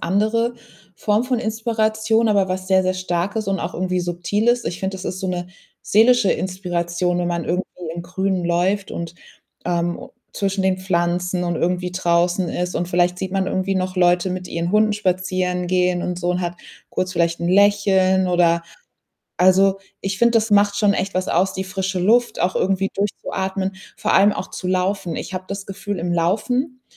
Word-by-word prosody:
andere 220 +6 +1 0.4
Form 210 +2 +1
von 250 -2 0
Inspiration, 220 0 0
aber 200 -3 +2
was 185 0 -3
sehr, 190 -1 +4
sehr 185 0 0
starkes 185 +4 -2
und 195 -1 -1
auch 180 - -4
irgendwie 185 0 -1
subtiles. 205 +8 0
Ich 175 - -4
finde 190 0 -2
das 185 - -9
ist 185 - -4
so 190 - -2
'ne 180 -1 -3 0.3
seelische 230 0 +4
Inspiration, 175 -1 -2
wenn 175 0 0
man 170 -1 -2
irgendwie 180 +2 -1 0.3
im 170 - -5
Grünen 185 +1 -2
läuft 185 +4 0
und, 170 0 -5 0.5
ähm, 175 0 -1 0.2
zwischen 195 -1 -1
den 190 -1 +1
Pflanzen 180 0 0
und 175 -1 -1
irgendwie 180 +1 -1
draußen 175 0 +1
ist 180 +1 -3
und 175 - -2
vielleicht 180 0 +1
sieht 185 0 -4
man 195 -1 0
irgendwie 190 +1 -1
noch 185 0 -2
Leute 180 0 +3
mit 180 0 -5
ihren 170 +2 -2
Hunden 210 0 +3
spazieren 185 -2 -1
gehen 180 -1 +1
und 180 -1 -3
so 180 0 -1
und 180 - -1
hat 175 0 -3 0.3
kurz 185 0 -2
vielleicht 170 -1 +1
'n 170 - -2
Lächeln 190 -1 +4
oder 170 -1 +3 0.8
also, 190 +2 +4 0.2
ich 195 0 -2
finde, 235 0 +4
das 225 -1 +2
macht 205 0 +4
schon 205 -1 +3
echt 195 0 -2
was 185 0 0
aus, 190 +1 +1
die 190 - -3
frische 190 0 -3
Luft 235 +6 +3
auch 180 - +1
irgendwie 195 0 0
durchzuatmen, 195 -1 -2 0.2
vor - - 0
allem 200 +2 +5
auch 185 - -5
zu 180 - -5
laufen. 185 -1 -1
Ich - - -6
habe 185 0 -4
das 200 0 -5
Gefühl, 205 0 -5
im 175 +1 -2
Laufen, 245 - 0
185 Hz, 185 wpm, -21 LUFS, 180-200 Hz, 0.8 s, allem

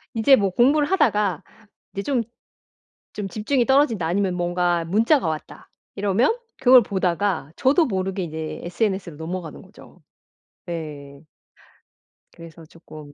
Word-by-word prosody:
이제 235 +4 +5
뭐 200 -2 0
공부를 280 +9 +3
하다가 210 - +1 0.5
이제 200 - -4
좀 255 0 0 0.9
좀 205 -2 -4
'집중이 230 +6 0
떨어진다.' 260 - +2
아니면 185 +1 0
뭔가 175 -1 0
'문자가 225 - +2
왔다.' 155 -1 -7 0.2
이러면 205 - +1 0.2
그걸 255 -1 +7
보다가 190 -4 -1
저도 285 - +3
모르게 190 -3 -2
이제 160 -1 -6
SNS로 180 -2 -2
넘어가는 165 -1 -6
거죠. - - -18 0.6
네. 150 -4 -7 1.1
그래서 165 -1 -13
쪼끔 155 -2 -14
190 Hz, 280 characters per minute, -22 LUFS, 170-230 Hz, 1.1 s, 그걸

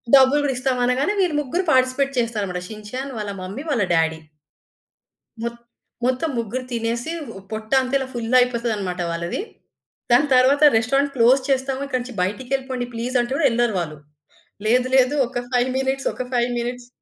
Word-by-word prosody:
డబ్బులు 270 +2 +6
గూడిస్తాం 260 -1 0
అనగానే 265 +10 +1
వీళ్ళు 340 -6 +2
ముగ్గురు 335 +7 -2
పార్టిసిపేట్ 260 +1 +2
చేస్తారన్నమాట 205 -6 -2
షిన్ 215 -1 -9
చాన్, 265 +2 -4
వాళ్ళ 205 -1 -3
మమ్మీ, 195 +10 -6
వాళ్ళ 235 -7 +2
డ్యాడీ. 160 0 +1 1.2
మొత్ 235 0 -4 0.5
మొత్తం 260 +5 0
ముగ్గురు 235 +3 -3
తినేసి 235 +4 -2 0.4
పొట్ట 220 0 -5
అంత 255 +1 -5
ఇలా 265 -1 -4
ఫుల్ 230 -2 -4
అయిపోతదన్నమాట 230 -7 -1
వాళ్ళది. 170 +1 -3 0.7
దాని 255 +5 +5
తరువాత 275 +4 +4
రెస్టారెంట్ 275 +5 +1
క్లోజ్ 255 +2 +5
చేస్తాము. 265 0 0
ఇక్కడి 255 -2 -1
నుంచి 250 -1 -8
బయటికెళ్ళిపొండి 255 +5 -2
ప్లీజ్ 240 +3 -4
అంటే 240 +2 -4
కూడా 290 - +1
యెళ్లరు 235 -2 +1
వాళ్ళు. 155 -3 -4 0.7
లేదు, 250 +2 +3
లేదు 260 +2 +4
ఒక 245 - -4
5 250 0 +2
మినిట్స్, 265 0 -1
ఒక - - -4
5 240 0 +2
మినిట్స్ 245 +1 -4
250 Hz, 155 wpm, -22 LUFS, 230-265 Hz, 1.2 s, డబ్బులు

